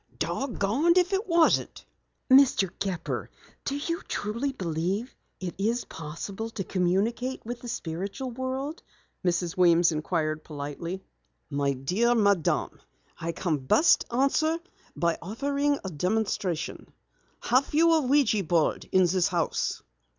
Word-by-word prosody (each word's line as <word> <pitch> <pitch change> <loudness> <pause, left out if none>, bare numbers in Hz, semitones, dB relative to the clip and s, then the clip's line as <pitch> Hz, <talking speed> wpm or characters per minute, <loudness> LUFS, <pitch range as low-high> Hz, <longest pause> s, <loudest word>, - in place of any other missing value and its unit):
"Dogonned 275 - +1
if 365 +2 +3
it 390 +4 0
wasn't!" 335 -2 +2 0.4
"Mr. 260 -8 +5
Gepper, 180 -4 -3 0.3
do 280 - -2
you 335 +4 -2
truly 235 +7 -2
believe 185 +3 -2 0.2
it 180 -2 -4
is 230 +4 0
possible 180 +8 -6
to 210 -3 -4
communicate 200 +9 0
with 240 +1 -5
the 245 - -8
spiritual 200 +6 -4
world?" 260 +5 -4 0.4
Mrs. 175 0 0
Weems 175 -2 +5
inquired 155 0 -1
politely. 155 +5 -6 0.5
"My 140 0 +1
dear 190 - +1
madam, 200 -7 +1 0.3
I 165 +1 -3
can 165 -2 -1
best 135 - +4
answer 275 +6 +2 0.4
by 170 -1 0
offering 280 +8 0
a 190 - -4
demonstration. 180 0 -2 0.5
Have 255 +3 +2
you 330 +1 +5
a 320 - +4
ouija 255 -6 +3
board 165 -2 +1
in 185 - +5
the 180 0 +2
house?" 170 -3 -1
200 Hz, 125 wpm, -27 LUFS, 170-265 Hz, 0.5 s, Mr